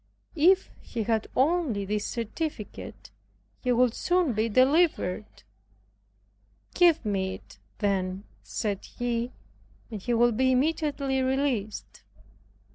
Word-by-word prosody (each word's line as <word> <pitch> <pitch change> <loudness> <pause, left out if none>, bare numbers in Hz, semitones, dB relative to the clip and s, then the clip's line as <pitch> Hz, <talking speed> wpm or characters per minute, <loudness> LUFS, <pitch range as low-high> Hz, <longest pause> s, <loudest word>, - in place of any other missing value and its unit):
If 365 +5 +4
he 230 -3 -4
had 220 0 0
only 275 - +1
this 210 +1 -2
certificate, 235 0 -5 0.5
he 250 - 0
would 245 -1 +3
soon 350 -4 +1
be 220 +2 0
delivered. 255 - +2 1.3
Give 345 -8 +4
me 190 -2 -1
it - - -16 0.2
then," 195 -2 -1 0.2
said 205 -3 -3
he, 240 0 -1 0.6
"and 210 -3 -5
he 240 +4 0
will 240 +1 +4
be 260 +3 +2
immediately 280 -1 0
released." 260 -5 -2
240 Hz, 110 wpm, -27 LUFS, 210-285 Hz, 1.3 s, If